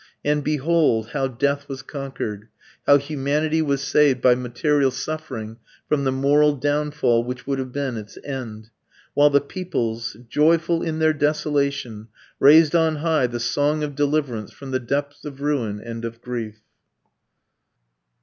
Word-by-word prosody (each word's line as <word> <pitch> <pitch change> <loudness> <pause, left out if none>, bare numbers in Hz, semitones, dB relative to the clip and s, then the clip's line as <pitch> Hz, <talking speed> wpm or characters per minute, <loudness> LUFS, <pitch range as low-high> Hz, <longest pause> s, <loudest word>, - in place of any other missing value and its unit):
And 150 0 +1
behold 150 -6 +1
how 135 -1 -1
death 140 +3 -1
was 135 -2 -6
conquered; 130 -7 -6 0.4
how 145 - +8
humanity 150 +2 -1
was 140 -3 0
saved 140 -1 +3
by 125 0 +5
material 130 +3 +1
suffering 130 -5 -5 0.3
from 140 -2 0
the 130 - +2
moral 145 +3 +3
downfall 145 -4 +1
which 125 +1 -6
would 135 -1 -1
have 130 -1 -4
been 135 -3 -3
its 105 -1 -9
end; 115 -5 -6 0.4
while 145 0 +5
the 140 0 +4
peoples, 120 - -4
joyful 165 +5 +2
in 160 -2 -2
their 160 0 +3
desolation, 145 -7 -1 0.3
raised 155 +3 +6
on 160 -2 +3
high 155 -4 +1
the 120 0 -5
song 145 +6 0
of 145 -1 -3
deliverance 140 -6 -1
from 135 -1 -10
the 130 - 0
depths 140 +3 -3
of 140 -2 -8
ruin 130 -8 -1
and 115 +1 -7
of 115 0 -6
grief! 115 -3 -6
140 Hz, 150 wpm, -22 LUFS, 120-150 Hz, 0.4 s, how